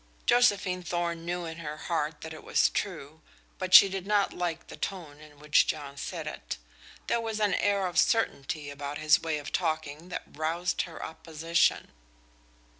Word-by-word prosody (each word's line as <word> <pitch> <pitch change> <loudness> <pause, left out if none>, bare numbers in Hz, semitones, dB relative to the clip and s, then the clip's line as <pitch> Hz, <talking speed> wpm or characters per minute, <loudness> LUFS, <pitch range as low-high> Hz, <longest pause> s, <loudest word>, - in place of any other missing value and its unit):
Josephine 200 -7 +3
Thorn 170 -1 -2
knew 175 0 -2
in 160 0 -7
her 150 -2 -5
heart 155 -2 -2
that 160 0 -7
it 155 - -10
was - - +3
true, 160 -5 -4 0.4
but 185 -1 -3
she - - +11
did 195 0 -5
not 205 -1 +2
like 175 -2 -3
the - - -10
tone 165 -7 -5
in 150 -1 -15
which 150 0 +3
John 140 -2 -3
said 140 - -5
it. - - -6 0.5
There 235 - +1
was 225 -1 -3
an 205 -3 +2
air 200 +1 +2
of 180 - +1
certainty 150 - +1
about 145 +1 -5
his 155 0 +4
way 160 -2 -1
of 145 -1 -7
talking 160 -1 -2
that - - -4
roused 165 +3 -1
her 165 - -7
opposition. 165 +1 0
165 Hz, 175 wpm, -29 LUFS, 150-185 Hz, 0.5 s, she